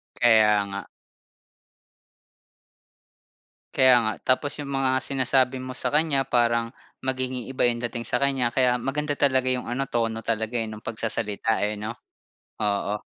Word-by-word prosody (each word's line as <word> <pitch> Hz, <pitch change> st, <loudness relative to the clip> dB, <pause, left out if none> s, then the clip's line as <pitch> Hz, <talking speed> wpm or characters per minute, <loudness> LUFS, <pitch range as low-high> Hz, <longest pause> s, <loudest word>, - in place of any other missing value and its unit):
Kaya 110 Hz, -3 st, +4 dB
nga. 100 Hz, 0 st, -5 dB, 2.9 s
Kaya 130 Hz, -1 st, +6 dB
nga, 110 Hz, -1 st, 0 dB, 0.2 s
tapos 145 Hz, +2 st, -5 dB
'yong 145 Hz, -, -5 dB
mga 135 Hz, -1 st, 0 dB
sinasabi 130 Hz, -1 st, +1 dB
mo 130 Hz, 0 st, -7 dB
sa -, -, -2 dB
kanya, 150 Hz, -4 st, +2 dB
parang 115 Hz, -1 st, +1 dB, 0.3 s
magiging 130 Hz, -2 st, -2 dB
iba 130 Hz, -, -3 dB
'yong 120 Hz, -1 st, +2 dB
dating 120 Hz, 0 st, -5 dB
sa 125 Hz, +2 st, 0 dB
kanya. 135 Hz, -3 st, +1 dB
Kaya 125 Hz, 0 st, +2 dB
maganda 145 Hz, +2 st, -1 dB
talaga 130 Hz, -2 st, +2 dB
'yong 125 Hz, -1 st, -1 dB
ano, 135 Hz, +2 st, -2 dB
tono 115 Hz, -2 st, -1 dB
talaga, 115 Hz, +1 st, -1 dB
eh, 115 Hz, -, -1 dB
no'ng 110 Hz, 0 st, -9 dB
pagsasalita, 110 Hz, -1 st, -1 dB
eh, 105 Hz, 0 st, -1 dB
'no? 110 Hz, +2 st, -5 dB, 0.6 s
Oo. 105 Hz, 0 st, -1 dB
120 Hz, 140 wpm, -25 LUFS, 110-130 Hz, 2.9 s, Kaya